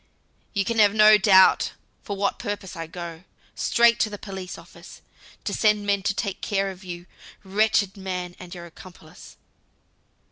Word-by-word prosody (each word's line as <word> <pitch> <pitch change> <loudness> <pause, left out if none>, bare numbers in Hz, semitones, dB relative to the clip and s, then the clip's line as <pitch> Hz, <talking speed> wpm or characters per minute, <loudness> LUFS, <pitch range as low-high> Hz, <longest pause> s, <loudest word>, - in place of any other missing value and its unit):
"You 200 -2 0
can 230 -1 -1
have 205 0 +5
no 215 0 +7
doubt 190 -2 +5 0.3
for 200 - -5
what 200 0 -1
purpose 200 -2 -5
I 165 -1 -6
go. 170 0 -8 0.3
Straight 235 0 +3
to 215 - +2
the 205 - -7
police 190 -2 -8
office, - - -14 0.4
to - - -3
send 210 -2 +2
men 200 -1 +1
to 195 +1 -1
take 200 -3 -3
care 195 -1 -1
of 190 +1 -13
you, 175 -1 -8 0.4
wretched 200 0 +1
man, 180 -2 -5
and 180 0 -10
your 175 -1 -9
accomplice. 170 0 -15
195 Hz, 165 wpm, -24 LUFS, 180-205 Hz, 0.4 s, no